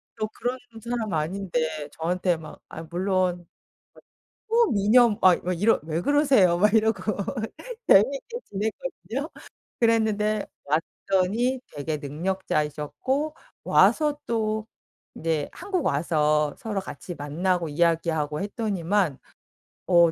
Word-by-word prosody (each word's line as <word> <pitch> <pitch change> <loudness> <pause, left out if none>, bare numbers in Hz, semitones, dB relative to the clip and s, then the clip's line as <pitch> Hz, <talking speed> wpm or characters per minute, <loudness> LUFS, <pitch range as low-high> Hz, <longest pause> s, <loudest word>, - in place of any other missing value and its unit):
또 215 -1 -2
그런 245 +3 -3 0.3
사람 235 -3 -2
아닌데 160 -2 -2
저한테 180 +1 0
막 155 -1 -11
아 160 - -7
물론 180 +1 -1 1.0
초미녀 240 - +4
막 185 -2 +5
막 180 - 0
이러 225 +3 +4
"왜 160 +1 -2
그러세요?" 270 - +4
막 210 +2 +4
이러고 220 -1 +3 0.9
재미있게 275 - +4
지냈거든요. 210 - -4 0.5
그랬는데 215 -2 +2 0.2
왔더니 195 - 0 0.2
되게 150 +2 -2
능력자이셨고 160 - -2 0.3
와서 300 -2 +4
또 220 -1 -1 0.5
네 160 -2 -1
한국 370 -3 -3
와서 150 0 +2
서로 210 -3 -3
같이 180 -1 -8
만나고 170 +4 -1
이야기하고 160 -1 +1
했더니만 200 - 0 0.7
어 170 -2 +6
190 Hz, 240 characters per minute, -25 LUFS, 160-220 Hz, 1.0 s, 어